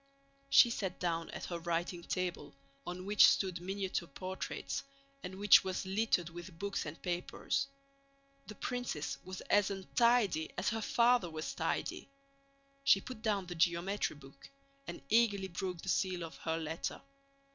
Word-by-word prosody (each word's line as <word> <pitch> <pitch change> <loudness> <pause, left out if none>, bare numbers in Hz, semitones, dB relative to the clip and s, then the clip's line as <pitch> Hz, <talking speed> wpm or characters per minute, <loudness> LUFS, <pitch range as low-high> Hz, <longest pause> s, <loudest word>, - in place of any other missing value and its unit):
She 240 - +7
sat 195 -5 -3
down 165 -2 -1
at - - -6
her 170 -1 -4
writing 170 +1 -2
table, 175 -4 -3 0.3
on 180 +1 -5
which 205 +1 +7
stood 185 -3 +1
miniature 190 -1 -2
portraits 185 +6 -4 0.4
and 185 +1 -6
which 205 +1 +7
was 190 0 -3
littered 190 -3 +1
with 175 0 -9
books 200 -2 -3
and 155 +3 -7
papers. 180 +9 -1 0.8
The 215 - -8
princess 245 - -3
was 185 0 -7
as 205 -1 +3
untidy 200 -3 +2
as 180 - +1
her 225 -1 -2
father 235 -4 +3
was 155 -1 -4
tidy. - - -2 0.7
She 275 0 +6
put 255 -4 -9
down 205 -4 0
the 175 - -6
geometry 170 +3 +1
book 135 -2 -15 0.4
and - - -7
eagerly 205 -4 +3
broke 180 -1 -4
the 190 - -4
seal 185 -2 0
of 165 - -7
her 160 0 -2
letter. 160 0 -3
185 Hz, 150 wpm, -34 LUFS, 170-205 Hz, 0.8 s, She